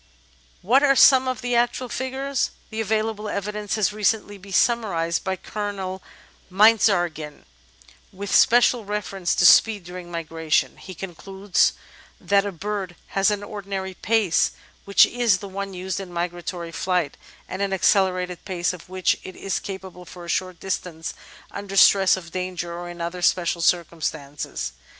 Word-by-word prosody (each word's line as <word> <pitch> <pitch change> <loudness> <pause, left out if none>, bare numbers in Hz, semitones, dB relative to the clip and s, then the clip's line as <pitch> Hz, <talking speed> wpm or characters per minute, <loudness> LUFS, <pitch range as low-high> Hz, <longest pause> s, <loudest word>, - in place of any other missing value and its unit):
What 245 +9 +4
are 275 -1 +4
some 260 -1 +6
of 255 -3 -2
the 245 -1 0
actual 240 +1 +1
figures? 265 +2 -2 0.2
The 220 0 -2
available 215 0 -1
evidence 210 +1 -3
has 210 -1 +1
recently 210 -1 0
been 195 +1 -13
summarised 190 -8 +1
by 190 -1 -1
Colonel 195 -1 -5 0.5
Meinertzhagen, 180 -7 +2 0.7
with 200 +1 -5
special 240 0 +5
reference 195 -3 -2
to 175 - +3
speed 210 +1 +6
during 180 0 -9
migration; 160 -2 -1
he 185 - -10
concludes 195 +2 0 0.5
that 200 0 +2
a - - -3
bird 195 0 -4
has 195 +2 +2
an 205 -1 -2
ordinary 195 -2 -5
pace, 210 -3 +1 0.3
which 200 - +6
is 235 -6 +2
the 200 - -8
one 195 0 -5
used 185 +1 -3
in 190 -2 -8
migratory 175 0 -4
flight, 180 -4 -1 0.3
and 190 - -5
an 200 -1 0
accelerated 185 -2 +1
pace 180 -2 -1
of 180 -1 -12
which 185 0 0
it 185 - -9
is 195 - -2
capable 190 -2 -8
for 175 0 -11
a - - -11
short 185 -1 -2
distance 180 -4 -4 0.4
under 200 -1 -6
stress 195 -1 +6
of 170 -3 -10
danger 180 -2 -4
or 175 0 -6
in 175 0 -8
other 170 +1 -4
special 175 -1 +1
circumstances. 150 - -2
190 Hz, 150 wpm, -23 LUFS, 175-210 Hz, 0.7 s, some